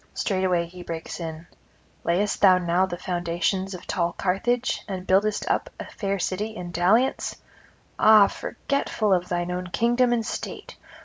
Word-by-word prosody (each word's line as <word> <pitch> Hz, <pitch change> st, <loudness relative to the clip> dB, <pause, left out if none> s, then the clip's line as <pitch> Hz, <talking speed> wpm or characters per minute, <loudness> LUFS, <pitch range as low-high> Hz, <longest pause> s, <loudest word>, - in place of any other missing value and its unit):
Straightway 185 Hz, -4 st, 0 dB
[265 180 Hz, +1 st, -11 dB
299]he -, -, -11 dB
breaks 165 Hz, +1 st, -5 dB
in: 165 Hz, 0 st, -6 dB, 0.6 s
'Layest 195 Hz, +4 st, 0 dB
thou 190 Hz, -2 st, +7 dB
now 180 Hz, +1 st, +1 dB
the 175 Hz, -, -5 dB
foundations 180 Hz, +2 st, -2 dB
of 180 Hz, -, -10 dB
tall 170 Hz, -1 st, -1 dB
Carthage, 240 Hz, +7 st, 0 dB
and 185 Hz, -2 st, -5 dB
buildest 205 Hz, +3 st, +2 dB
up -, -, 0 dB
a -, -, -5 dB
fair 200 Hz, -2 st, -3 dB
city 205 Hz, +4 st, -3 dB
in 175 Hz, -4 st, -6 dB
dalliance? 195 Hz, +10 st, +2 dB, 0.6 s
ah, 215 Hz, -2 st, +8 dB
forgetful 215 Hz, -2 st, -1 dB
of 180 Hz, -1 st, 0 dB
thine 175 Hz, 0 st, -1 dB
own 180 Hz, 0 st, -3 dB
kingdom 240 Hz, +6 st, +2 dB
and 235 Hz, -2 st, +1 dB
state! -, -, -6 dB
185 Hz, 160 wpm, -25 LUFS, 175-210 Hz, 0.6 s, ah